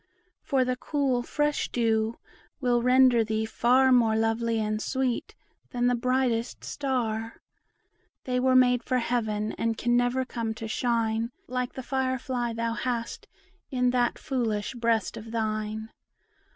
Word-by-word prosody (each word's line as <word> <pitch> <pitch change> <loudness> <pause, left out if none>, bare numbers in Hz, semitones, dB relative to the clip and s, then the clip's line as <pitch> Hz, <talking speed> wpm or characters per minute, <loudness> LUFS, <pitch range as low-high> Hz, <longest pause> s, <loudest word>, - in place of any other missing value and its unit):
For 265 -2 +1
the 255 0 0
cool 265 -2 0
fresh 295 +4 -1
dew 225 -1 0 0.4
will 245 -3 +2
render 250 -1 +5
thee 220 0 -1
far 255 +4 +3
More 230 -3 +4
lovely 225 +1 +1
and 215 0 -1
sweet 260 -1 -2 0.3
than 245 0 -1
the 245 - +3
brightest 245 -1 0
star; 230 -5 -2 0.8
They 250 -1 -1
were 260 0 +3
made 250 -1 +5
for 255 - 0
Heaven, 220 -3 -1
and 230 -1 0
can 240 0 +1
never 245 +2 +1
come 230 -3 -3
to 225 - -6
shine 230 0 0 0.2
Like 250 0 -2
the 260 - -6
fire 260 0 0
fly 245 -2 -2
thou 230 0 -2
hast 235 -1 -3 0.4
in 250 -1 +1
that 245 -1 +1
foolish 230 -7 -2
breast 230 -4 0
of 225 +1 -9
thine. 220 -1 -3
240 Hz, 145 wpm, -27 LUFS, 225-255 Hz, 0.8 s, render